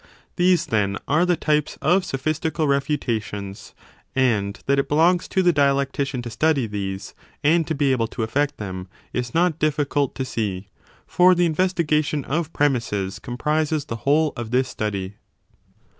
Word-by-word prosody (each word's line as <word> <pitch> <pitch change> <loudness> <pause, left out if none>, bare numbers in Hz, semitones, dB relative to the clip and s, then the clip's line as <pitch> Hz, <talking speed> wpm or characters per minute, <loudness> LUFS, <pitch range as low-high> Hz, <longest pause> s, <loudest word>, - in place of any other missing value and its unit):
These, 180 -1 +3
then, 100 -2 0
are 160 +5 +3
the 175 - +3
types 150 -1 0
of 180 +6 +3
sophistical 155 0 -1
refutations: 115 -8 -2 0.4
and 110 -7 +1
5 - - -25
that 140 0 +2
it 140 - -1
belongs 170 +4 +3
to 190 - +1
the 175 -1 +4
dialectician 140 -2 +1
to 120 - -6
study 150 0 +2
these, 95 -2 -5 0.3
and 160 +2 +3
to 160 - -1
be 140 -1 +2
able 115 -3 +1
to 115 - -4
effect 145 +6 0
them, 95 -3 -6 0.3
is 125 +1 -3
not 170 -2 +2
difficult 145 -2 0
to 130 - -2
see: 100 -6 -3 0.4
for 180 +1 +5
the 175 0 +3
investiga 165 -2 +1
tion 145 -2 -3
of 160 +2 -2
premisses 115 -10 0
comprises 150 +4 -1
the 115 -6 -5
whole 145 +5 +2
of 120 -2 -5
this 130 +2 +2
study. 100 -2 -4
140 Hz, 160 wpm, -23 LUFS, 115-155 Hz, 0.4 s, for